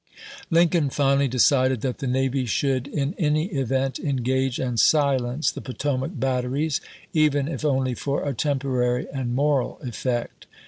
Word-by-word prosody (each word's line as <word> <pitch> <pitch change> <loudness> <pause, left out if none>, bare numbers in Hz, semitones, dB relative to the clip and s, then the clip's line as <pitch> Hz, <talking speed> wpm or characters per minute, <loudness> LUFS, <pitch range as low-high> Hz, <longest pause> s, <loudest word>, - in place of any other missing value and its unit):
Lincoln 165 -3 +3
finally 140 0 +2
decided 130 -1 +3
that 130 -1 -3
the 135 - -3
navy 130 0 0
should 130 +3 0
in 140 +1 -2
any 155 +1 +1
event 135 -2 -1
engage 130 -2 0
and 125 -3 -2
silence 140 -1 +2
the - - -8
Potomac 130 0 -3
batteries, 135 +3 -1 0.3
even 145 -3 +2
if 160 - -5
only 130 -3 +1
for 140 +4 -2
a 140 - -1
temporary 130 -2 0
and 125 -3 -2
moral 140 -1 +1
effect. 120 -1 -3
135 Hz, 140 wpm, -24 LUFS, 130-145 Hz, 0.3 s, Lincoln